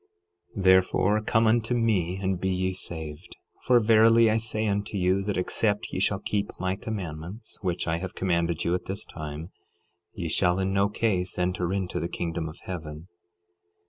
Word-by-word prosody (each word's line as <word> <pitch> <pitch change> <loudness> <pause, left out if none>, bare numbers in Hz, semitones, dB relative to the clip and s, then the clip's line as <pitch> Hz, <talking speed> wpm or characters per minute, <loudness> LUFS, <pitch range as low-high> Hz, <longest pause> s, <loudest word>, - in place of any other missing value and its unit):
12:20 95 - -2
Therefore 95 +3 +4
come 115 +1 +2
unto 115 +2 +2
me 100 -7 +1
and 95 -2 -1
be 95 - 0
ye 95 0 0
saved; 80 -2 -7 0.3
for 125 -1 +6
verily 115 0 +5
I 110 - +2
say 110 -1 -1
unto 100 0 -1
you, 95 +1 +2
that 100 +1 -2
except 105 +3 0
ye - - -1
shall 100 +1 +2
keep 100 +1 -2
my 95 +1 0
commandments, 95 0 -6
which 90 -4 -2
I 80 +1 0
have 95 0 -6
commanded 85 -2 0
you 85 - +1
at 90 - -2
this 100 +3 -4
time, 75 +1 -7 0.6
ye 85 -3 -4
shall 90 +2 +2
in 95 0 0
no 100 +1 +3
case 95 -5 -1
enter 90 0 0
into 95 -2 -2
the 85 - -3
kingdom 85 -2 -3
of 75 - -11
heaven. 80 -2 -7
95 Hz, 175 wpm, -27 LUFS, 85-105 Hz, 0.6 s, for